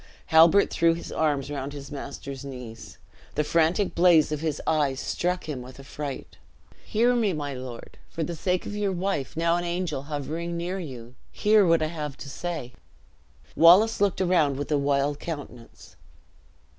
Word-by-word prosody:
Halbert 165 +5 +6
threw 165 0 +3
his 170 - -8
arms 145 -3 0
round 140 0 -4
his 140 0 -9
master's 140 -1 -7
knees. 125 -5 -9 0.4
The 150 - +2
frantic 165 +5 +1
blaze 170 -3 +5
of 150 - -1
his 155 -2 -2
eyes 145 -4 +1
struck 180 +2 -2
him 140 -5 -4
with 130 +2 -12
affright. 140 0 -7 0.5
"Hear 235 +3 +2
me, 220 -5 +1
my 145 -2 -4
lord; 125 -2 -9
for 165 - -3
the 170 +2 -4
sake 180 +3 -1
of 205 - -5
your 205 -1 0
wife, 180 -7 -2
now 170 +1 +2
an 175 - -2
angel 175 -5 -2
hovering 155 +4 -4
near 180 +3 -3
you, 125 -8 -8 0.2
hear 210 -2 +4
what 165 -1 +4
I 155 +2 -2
have 150 -4 -5
to 140 - -8
say." 160 -7 -5 0.8
Wallace 195 +7 +6
looked 200 -2 +2
around 165 -7 +2
with 145 +2 -5
a 150 - +3
wild 140 +1 0
countenance. 145 -7 -9
155 Hz, 170 wpm, -26 LUFS, 140-175 Hz, 0.8 s, Halbert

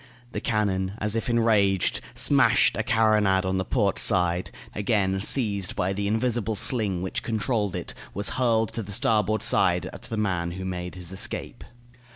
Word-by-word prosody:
The - - -4
cannon, 100 -4 -1
as 105 0 0
if 115 - -2
enraged, 105 -5 +2
smashed - - +4
a - - 0
carronade 105 -4 +2
on 95 0 0
the - - 0
port 100 -1 0
side; 90 -1 +2 0.2
then, - - -6
again 95 -3 +1
seized 100 -5 +1
by 95 +2 -1
the 100 +1 -2
invisible 110 0 -1
sling 100 -6 0
which 95 - -3
controlled 110 -3 -1
it, 90 - -5
it - - -15 0.2
was 100 +1 0
hurled 115 -3 +1
to 115 - -2
the 100 -1 -8
starboard 110 0 +1
side - - +2
at - - -10
the 115 -1 -6
man, 90 -5 -1
who 95 +1 -6
made 90 -1 -5
his 90 -1 -5
escape. 105 +4 -3
100 Hz, 180 wpm, -25 LUFS, 95-110 Hz, 0.2 s, smashed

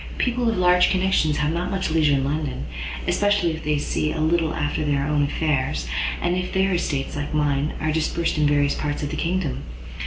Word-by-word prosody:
People 245 -1 +1
of 225 - -1
large 180 0 +4
connections 185 -5 +2
have 150 +1 0
not 175 +1 -2
much 190 -4 -2
leisure 155 -3 +3
in 135 - 0
London, 140 - -2 0.4
especially 205 -4 +2
if 160 0 -6
they 150 0 +1
see 155 +1 -1
a 160 - -4
little 160 +1 +2
after 150 +1 -1
their 140 -2 0
own 150 0 +1
affairs, 140 - 0 0.3
and 175 - 0
if 180 0 -2
their 190 0 +1
estates, 140 -6 -2
like 145 +1 -3
mine, 145 0 +1
are 155 - 0
dispersed 160 +1 0
in 150 - +4
various 145 -1 +2
parts 145 0 -3
of 145 - -3
the - - -3
kingdom. 175 -3 -1
155 Hz, 205 wpm, -23 LUFS, 145-180 Hz, 0.4 s, large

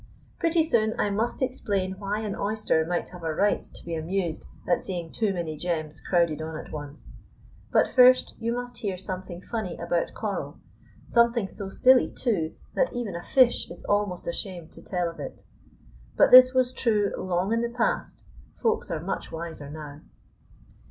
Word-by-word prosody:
Pretty 335 -1 +3
soon 220 -7 +1
I 205 - +1
must 225 +6 -1
explain 200 -7 -2
why 205 +1 -2
an 210 -3 -3
oyster 210 -6 +1
might 175 0 -2
have 180 -1 -11
a 160 -1 -2
right 205 +4 +2
to - - -14
be 170 - -4
amused 165 +1 -2 0.2
at 175 - +2
seeing 175 -3 -4
too 215 -3 0
many 170 -4 -3
gems 155 -2 -3
crowded 170 -4 +1
on 160 0 -5
at - - -9
once. 145 -1 -8 0.6
But - - +4
first 255 0 +6
you 230 +1 -1
must 245 0 -4
hear 195 -4 -2
something 185 -1 -6
funny 220 -7 -4
about 170 0 -1
coral, - - -4 0.5
something 235 -3 +3
so 195 0 -7
silly, 255 +5 +5
too, 180 -11 -1 0.2
that - - +1
even 235 -7 -3
a 170 - -4
fish 255 +5 +3
is - - -10
almost 205 -3 0
ashamed 170 -1 -4
to - - -13
tell 180 -2 -1
of 165 -2 -8
it; 140 - -7 0.7
but - - +5
this 255 0 +10
was 255 -1 +2
true 210 -5 +1
long 185 +3 -1
in 230 - +1
the 235 - -1
past, 235 0 -1 0.3
Folks 450 - 0
are 165 -3 -2
much 195 - -4
wiser 160 -3 -6
now. 150 -1 -9
195 Hz, 175 wpm, -26 LUFS, 170-235 Hz, 0.7 s, this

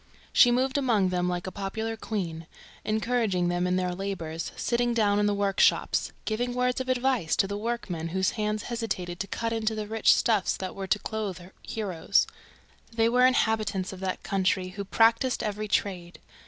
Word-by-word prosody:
She 245 - +7
moved 260 +3 +1
among 220 -8 +2
them 180 0 0
like 175 0 -3
a 185 - -4
popular 220 +4 -3
queen, 170 -8 -4 0.4
encouraging 215 -5 0
them 175 +1 0
in 180 - +1
their 180 -1 0
labors, 175 -4 -4
sitting 240 0 0
down 205 -2 +3
in 210 - +3
the 205 - +2
workshops, 200 -1 +2
giving 245 +3 -1
words 250 +1 +1
of 260 - -5
advice 255 -8 +1
to - - +3
the 200 - -4
workmen 205 -7 -3
whose 190 +2 0
hands 210 -1 -2
hesitated 195 -7 -4
to 195 - -3
cut 230 +3 -2
into 220 -1 -1
the 215 -1 -3
rich 220 +1 +3
stuffs 215 -5 +1
that 185 -1 -5
were 195 -1 -5
to 210 - +2
clothe 210 -4 -4 0.2
heroes. 195 -7 0 0.7
There 225 0 +2
were 250 +1 +6
inhabitants 215 -6 0
of 185 - -9
that 190 -1 -3
country 190 -1 0
who 200 +2 -6
practised 230 +5 +3
every 210 0 -3
trade. 185 -3 -1
205 Hz, 180 wpm, -27 LUFS, 185-230 Hz, 0.7 s, She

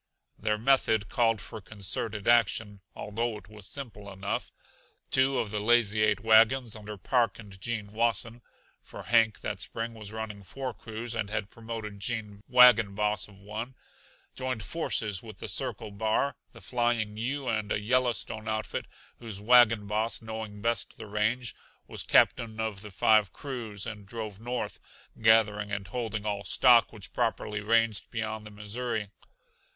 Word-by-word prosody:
Their 105 0 0
method 110 -3 +2
called 115 -2 +2
for 110 - -8
concerted 100 +1 -2
action, 110 -3 +3
although 115 +2 -2
it 100 -2 -14
was 105 -1 -8
simple 105 -8 -5
enough. 95 +1 -3 0.6
Two 130 0 +3
of 105 - -1
the 105 - -1
Lazy 110 -1 +3
Eight 105 -1 +3
wagons, 115 +2 +5
under 105 -1 -8
Park 115 +1 +1
and 100 -4 -12
Gene 115 -2 -2
Wasson 115 +2 -1 0.4
(for - - -10
Hank 115 -2 +3
that - - -3
spring 115 +1 -4
was 105 -2 -8
running 110 -2 -5
four 130 +7 -5
crews 115 +1 -6
and 110 -3 -2
had 105 -1 -3
promoted 110 -3 -7
Gene 105 -2 -3
wagon 120 -5 +7
boss 105 0 0
of 100 -2 -16
one), 110 +5 -6 0.6
joined 130 -4 -3
forces 105 - 0
with 110 -4 -11
the - - -6
Circle 105 - -3
Bar, 110 +7 0 0.2
the - - -14
Flying 120 -3 0
U, 130 +4 -2
and 110 -2 -1
a - - +1
Yellowstone 115 -1 0
outfit 110 -2 -2 0.3
whose 110 -5 -7
wagon 115 -1 +6
boss, 110 +3 -1
knowing 110 -2 -7
best 115 -3 -1
the - - -8
range, 110 +3 -1 0.3
was - - -4
captain 110 -2 +3
of 110 -3 -2
the 105 - -8
five 105 0 +4
crews; 115 -7 -6
and 105 -3 -7
drove 105 -2 -6
north, 120 -2 -4 0.4
gathering 105 -2 +4
and 100 -2 -3
holding 110 -3 -3
all 100 -1 -2
stock 120 +2 +5
which 100 -5 -11
properly 105 -2 -1
ranged 115 0 +2
beyond 110 -2 -4
the - - -9
Missouri. 105 +1 -3
110 Hz, 155 wpm, -29 LUFS, 105-115 Hz, 0.6 s, wagon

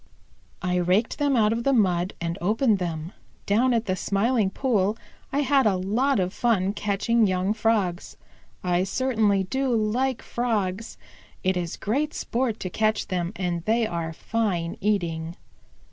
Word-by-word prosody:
"I 180 -1 +1
raked 185 - +1
them 285 -2 +2
out 215 -2 +3
of 235 +1 -2
the 275 - +2
mud 185 -6 +2
and 170 0 -2
opened 215 +3 +2
them. 165 -1 -4 0.3
Down 235 +6 +3
at 230 -1 +1
the 185 - 0
Smiling 205 +2 +1
Pool 210 -2 0 0.3
I 285 - +1
had 275 -3 +3
a 200 - +2
lot 215 +8 +1
of 185 +1 -1
fun 200 -5 +1
catching 210 +2 +1
young 185 +2 0
Frogs. 210 -5 0 0.5
I 180 0 +1
certainly 215 -2 +1
do 265 +8 -1
like 230 +4 0
Frogs. 220 -4 -2 0.5
It 185 0 +2
is 175 -2 -3
great 290 +8 -1
sport 235 -2 -1
to 185 - -3
catch 215 +2 0
them, 180 -1 -1
and 175 -3 -2
they 225 +1 +2
are 170 -5 -3
fine 175 -2 -2
eating." 170 -5 -1
205 Hz, 155 wpm, -25 LUFS, 180-230 Hz, 0.5 s, out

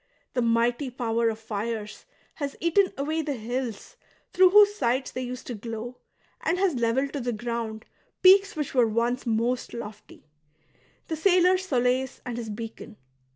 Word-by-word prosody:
The 250 - +1
mighty 235 +3 +1
power 235 -2 0
of 220 - -3
fires 220 0 -5 0.3
has 280 -2 -4
eaten 370 +3 +3
away 310 +4 -1
the 295 -3 -3
hills 235 -1 -5 0.4
through 370 0 +6
whose 410 +1 +7
sides 260 - 0
they 255 - -4
used 250 0 -6
to 245 - -5
glow, 230 +2 -7 0.4
and 335 +3 0
has 380 -2 +2
levelled 250 +3 0
to 285 - -2
the 245 -1 -2
ground 230 -1 -4 0.4
peaks 390 +2 +6
which 300 -3 -3
were 245 -3 +4
once 235 +3 -1
most 235 +2 -1
lofty 210 -6 -9 0.4
— - - -36
the 320 - -2
sailor's 365 +2 +3
solace 255 -1 0
and 245 -2 -4
his 230 -2 -5
beacon. 225 0 -8
245 Hz, 160 wpm, -26 LUFS, 230-295 Hz, 0.4 s, whose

